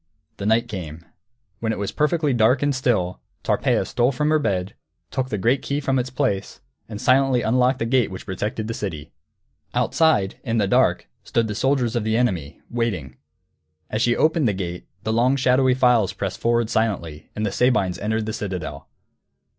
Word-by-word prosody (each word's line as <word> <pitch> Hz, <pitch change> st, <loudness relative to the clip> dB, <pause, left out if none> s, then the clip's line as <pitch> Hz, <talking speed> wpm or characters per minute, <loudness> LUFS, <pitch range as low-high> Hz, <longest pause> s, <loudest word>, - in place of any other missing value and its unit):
_ -, -, -45 dB
The 100 Hz, -, -3 dB
night 115 Hz, +2 st, +3 dB
came. 85 Hz, -6 st, -7 dB, 0.5 s
When 110 Hz, -1 st, -1 dB
it -, -, -3 dB
was 100 Hz, -1 st, -3 dB
perfectly 150 Hz, -1 st, +1 dB
dark 120 Hz, +3 st, +3 dB
and 145 Hz, 0 st, +2 dB
still, 110 Hz, -9 st, 0 dB, 0.2 s
Tarpeia -, -, +1 dB
stole 125 Hz, +2 st, +1 dB
from 150 Hz, +3 st, 0 dB
her 155 Hz, -, +4 dB
bed, 95 Hz, -8 st, -1 dB, 0.4 s
took 130 Hz, -1 st, -2 dB
the 105 Hz, -, -2 dB
great 120 Hz, +7 st, +2 dB
key 140 Hz, +1 st, -2 dB
from 135 Hz, -2 st, 0 dB
its 125 Hz, +1 st, -2 dB
place, 130 Hz, -7 st, -2 dB, 0.3 s
and 105 Hz, -2 st, -6 dB
silently 130 Hz, 0 st, +3 dB
unlocked 125 Hz, +3 st, +2 dB
the 115 Hz, -, -2 dB
gate 120 Hz, -2 st, +2 dB
which 95 Hz, -1 st, -8 dB
protected 105 Hz, +3 st, -3 dB
the 115 Hz, -, -3 dB
city. 80 Hz, -8 st, -5 dB, 0.6 s
Outside, 155 Hz, -13 st, +2 dB
in 115 Hz, -3 st, -1 dB
the 105 Hz, -, +3 dB
dark, -, -, +2 dB, 0.2 s
stood 115 Hz, -1 st, 0 dB
the 105 Hz, -, -3 dB
soldiers 125 Hz, 0 st, +1 dB
of 120 Hz, -, 0 dB
the 110 Hz, +1 st, +1 dB
enemy, 90 Hz, -, -1 dB
waiting. 95 Hz, -, -2 dB, 0.7 s
As 110 Hz, -, -1 dB
she 120 Hz, 0 st, +3 dB
opened 155 Hz, -3 st, +3 dB
the 105 Hz, -, +1 dB
gate, 90 Hz, -2 st, -5 dB, 0.2 s
the 110 Hz, -, -1 dB
long 125 Hz, +4 st, +3 dB
shadowy 130 Hz, -1 st, +3 dB
files 125 Hz, -6 st, +3 dB
pressed 95 Hz, -2 st, -4 dB
forward 115 Hz, -1 st, +1 dB
silently, 85 Hz, -9 st, -1 dB
and 105 Hz, -, -1 dB
the 100 Hz, -, -1 dB
Sabines 100 Hz, -7 st, +1 dB
entered 110 Hz, +1 st, -1 dB
the 110 Hz, -, -3 dB
citadel. 95 Hz, -4 st, -5 dB
115 Hz, 185 wpm, -23 LUFS, 100-130 Hz, 0.7 s, her